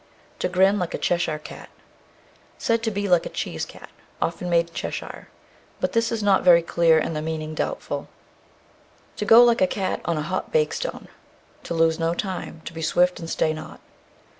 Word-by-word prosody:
To - - 0
grin 190 +3 +3
like 180 -2 -2
a - - -2
Cheshire 170 -3 0
cat. 150 - -11 0.9
Said 230 0 0
to 230 - 0
be 205 -1 -2
like 175 -3 +3
a - - -7
cheese - - -4
cat, - - -13 0.3
often 175 +1 -2
made 170 -1 +2
in - - -25
Cheshire; - - -6 0.5
but - - -1
this 230 0 +1
is 225 -2 -2
not 200 -2 +4
very 170 -2 +6
clear, 170 -1 +3
and 160 +1 -1
the 150 - -2
meaning 155 0 -4
doubtful. - - -3 1.1
To 210 - -2
go 225 +3 +8
like 235 -1 +3
a 185 - +5
cat 190 -1 -2
on 170 -2 0
a 150 - -2
hot 185 +4 -3
bake 470 -1 +2
stone. - - -5 0.6
To 170 - -3
lose 165 0 +2
no 165 +1 0
time. 185 -4 -5
To - - -7
be 165 - -6
swift 180 +3 +2
and 165 - -7
stay 155 - +1
not. 155 0 -9
175 Hz, 195 wpm, -24 LUFS, 165-205 Hz, 1.1 s, go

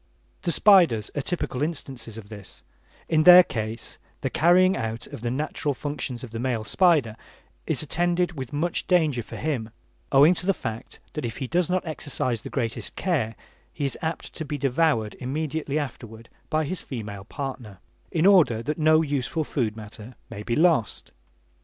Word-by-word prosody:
The 170 - 0
spiders 170 - +5
are 145 - 0
typical 140 -4 -3
instances 135 -8 -3
of 105 -2 -10
this: 100 -3 -11 0.4
in 155 -1 +3
their 180 +2 +10
case 110 -5 -5 0.2
the - - -2
carrying 185 +3 +4
out 115 +1 -3
of - - -9
the 120 - -2
natural 145 +2 -2
functions 130 -4 -4
of 125 - -8
the 115 - -5
male 120 -3 -1
spider 150 - +3 0.5
is - - +1
attended 175 +3 0
with 135 -6 -7
much 155 +4 -2
danger 155 -9 +2
for - - -10
him, 130 -8 -2 0.4
owing 145 +5 +7
to 180 +1 -5
the 195 - +3
fact 115 0 -6 0.2
that 150 - -4
if 115 -2 -4
he 130 - -3
does 170 +6 0
not 185 0 0
exercise 135 -7 -2
the - - -8
greatest 115 -4 -3
care, 140 - -1 0.4
he 145 - -3
is 135 - -1
apt 160 0 -4
to 160 - -5
be 150 -1 -4
devoured 135 -5 +1
immediately 150 +2 -2
afterward 115 -6 -6 0.2
by 155 0 +1
his 185 +4 -4
female 105 -6 -7
partner, 125 -6 -6 0.3
in 165 +1 +1
order 165 - +5
that 150 +4 -3
no 155 +1 +5
useful 145 +1 -1
food 115 -7 -2
matter 110 +2 -10 0.2
may 105 -2 -6
be 115 +2 -2
lost. 155 - +2
140 Hz, 175 wpm, -25 LUFS, 115-160 Hz, 0.5 s, their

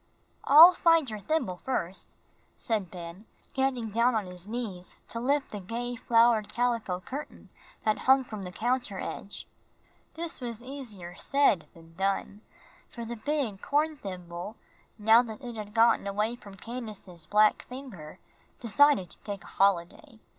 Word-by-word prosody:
"I'll 325 +6 +10
find 330 -4 +4
your 215 - -5
thimble 200 - -1
first," 190 -6 -4 0.4
said 210 -6 -1
Ben, 175 +4 -9 0.3
getting 260 -4 0
down 235 +3 +3
on 215 -3 0
his 180 +1 -7
knees 215 -6 -5
to 230 - -4
lift 280 +3 0
the 210 - -5
gay 235 +5 -4
flowered 230 -2 +3
calico 230 -6 0
curtain 275 +10 -8 0.3
that 215 -1 +1
hung 265 0 +7
from 215 -4 -7
the 180 -1 -6
counter 240 -1 -1
edge. 200 - -6 0.7
This 330 -3 -5
was 235 -1 -6
easier 230 -10 -8
said 275 - +2
than 165 0 -16
done, 195 +3 -2 0.5
for 235 -1 -7
the 235 +1 -5
big 240 -5 -2
horn 305 +2 +1
thimble, 180 -3 -7 0.4
now 220 +2 +6
that 235 +1 -8
it 240 -2 -6
had 210 -1 -7
gotten 230 -2 +4
away 210 +4 -1
from 200 -5 -13
Candace's 205 -7 -8
black 210 +2 +4
finger, 245 - -10 0.4
decided 245 -4 +3
to - - -10
take 200 -2 -6
a - - -14
holiday. 195 +3 +1
220 Hz, 150 wpm, -29 LUFS, 195-250 Hz, 0.7 s, I'll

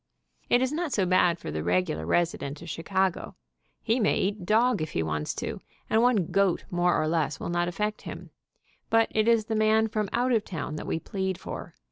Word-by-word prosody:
It 245 +1 +4
is 260 - 0
not 325 0 -2
so 195 -6 +1
bad 180 -1 +3
for 170 - -7
the 75 0 -3
regular 85 -3 0
resi 175 - +1
dent 145 +3 -6
of 170 - -8
Chicago. 185 +3 -1 0.5
He 230 +3 +1
may 210 - +2
eat 195 -2 -2
dog 230 -1 +3
if 155 - -4
he 80 - 0
wants 75 -1 -2
to, - - -4 0.3
and 220 - +4
one 230 -8 +2
goat 195 -3 +2
more 175 0 +2
or 155 - 0
less 155 -3 0
will - - -4
not 175 0 0
affect 210 +4 -2
him, - - -9 0.6
but 225 0 +3
it 215 +1 +1
is 230 -2 +4
the 225 - -3
man 220 +1 +3
from 210 -2 -1
out 250 +2 +1
of 225 -3 +2
town 165 -5 -5
that - - -6
we 160 - -1
plead 190 +1 -3
for. - - -8
190 Hz, 215 wpm, -27 LUFS, 165-220 Hz, 0.6 s, It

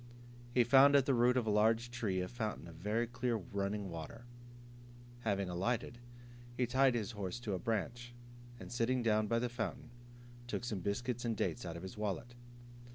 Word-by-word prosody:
He 120 0 +4
found 135 +4 +7
at 140 -2 +6
the 135 - +3
root 125 +1 +4
of 125 - +1
a 110 - +1
large 110 +3 +3
tree 105 -7 -1
a 90 - -2
fountain 110 0 -4
of 85 - -10
very 105 +7 0
clear 120 0 -1
running 100 0 -2
water. 85 +9 -7 0.9
Having 100 -5 -1
alighted, 115 +6 -1 0.6
he 125 - +2
tied 130 +1 +3
his 110 -1 -1
horse 105 +1 -4
to 105 -4 -2
a 95 - -1
branch, 120 +4 -3 0.4
and - - -9
sitting 120 +1 +1
down 110 -1 +3
by 115 - +2
the 125 +1 +1
fountain, 120 0 -4 0.6
took 120 - -3
some 110 -5 -2
biscuits 120 +6 -2
and 115 -3 -1
dates 120 -2 -1
out 85 0 -5
of 85 - -9
his 95 +3 -7
wallet. 105 +3 -3
115 Hz, 185 wpm, -35 LUFS, 100-120 Hz, 0.9 s, found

